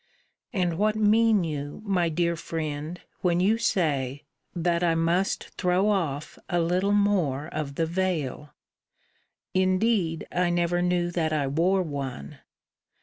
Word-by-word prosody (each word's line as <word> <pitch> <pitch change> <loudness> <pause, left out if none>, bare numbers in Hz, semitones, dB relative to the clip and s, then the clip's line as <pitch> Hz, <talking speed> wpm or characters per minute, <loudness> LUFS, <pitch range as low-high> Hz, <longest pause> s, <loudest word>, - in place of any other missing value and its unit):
And 180 -5 -1
what 215 +1 +2
mean 215 -1 +4
you, 145 +2 -5
my 180 -4 +1
dear 170 +1 0
friend, 160 0 -4 0.2
when 175 -1 +2
you 210 +5 +3
say, 145 - 0 0.3
that 170 0 +1
I 165 -1 +3
must 170 +4 0
throw 180 +3 +2
off 160 -8 -2
a 175 -2 +1
little 180 +4 +1
more 190 -9 +2
of 145 -3 -4
the 165 - +1
veil? 165 -5 -2 1.0
Indeed 185 -2 +1
I 180 0 +1
never 175 0 +1
knew 175 -1 +1
that 160 -2 0
I 150 -2 +1
wore 175 +7 +2
one. 135 - -6
175 Hz, 135 wpm, -26 LUFS, 155-185 Hz, 1.0 s, mean